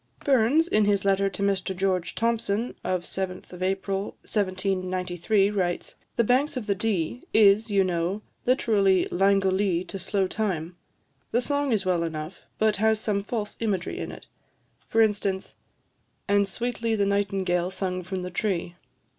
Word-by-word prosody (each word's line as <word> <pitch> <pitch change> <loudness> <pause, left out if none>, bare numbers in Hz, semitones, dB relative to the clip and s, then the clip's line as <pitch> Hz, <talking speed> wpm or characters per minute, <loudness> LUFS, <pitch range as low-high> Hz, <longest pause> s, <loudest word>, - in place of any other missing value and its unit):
Burns, 275 +5 +4
in 215 -9 +3
his 200 -1 +1
letter 195 0 +3
to 200 - -5
Mr 195 -1 0
George 185 -2 0
Thomson, 230 -1 0
of 185 -1 -1
7th 185 -1 -5
April 195 +1 -1
1793, 185 0 0
writes 180 -4 -2 0.2
"'The 235 - +3
Banks 260 +5 +2
of 240 - -4
the 205 - +1
Dee' 200 +1 -1
is, 215 +1 +5
you 200 -2 +3
know, 180 +3 -1 0.2
literally 200 -7 +3
'Langolee' 195 -1 +2
to 195 - -6
slow 195 +1 0
time. 185 -5 -2 0.5
The 240 - +2
song 285 +2 0
is 210 -4 +1
well 180 -2 +2
enough, 160 +1 -4 0.2
but 215 -2 +2
has 220 +1 +3
some 205 -2 -1
false 210 -1 -4
imagery 200 -6 -2
in - - -4
it; - - -11 0.6
for 225 0 +4
instance 200 -3 -1 0.7
"'And 200 -1 +3
sweetly 230 +2 -2
the 200 -2 +2
nightingale 195 -3 0
sung 185 -1 -3
from 185 +1 -4
the 180 - -5
tree.' 175 -3 -2
195 Hz, 150 wpm, -26 LUFS, 185-215 Hz, 0.7 s, is